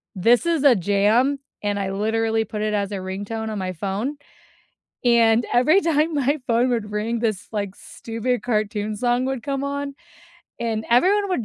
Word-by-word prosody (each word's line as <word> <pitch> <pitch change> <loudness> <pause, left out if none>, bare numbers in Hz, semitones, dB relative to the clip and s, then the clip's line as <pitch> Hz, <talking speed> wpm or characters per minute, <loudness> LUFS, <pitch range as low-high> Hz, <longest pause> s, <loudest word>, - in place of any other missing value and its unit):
"This 230 - +3
is 330 -4 +1
a 275 -4 +7
jam," 210 +8 +2 0.2
and 205 0 -1
I 195 -1 -2
literally 220 +2 0
put 210 0 -5
it 215 0 -1
as 200 0 -1
a - - -3
ringtone 205 +4 -4
on 215 - -4
my 185 -1 -3
phone, 200 - -3 0.9
and 235 -1 +4
every 305 +11 +5
time 320 -1 +1
my 285 +2 +1
phone 235 +2 +2
would 225 -4 -2
ring, 220 +2 -1
this, 215 -4 -1
like, 200 -2 -3
stupid 230 +2 -4
cartoon 215 -2 -1
song 245 +3 +1
would 265 -3 -3
come 275 -1 -2
on, 280 0 -3 0.7
and 225 -2 -2
everyone 390 - +4
would 245 -11 -1
225 Hz, 175 wpm, -22 LUFS, 210-265 Hz, 0.9 s, a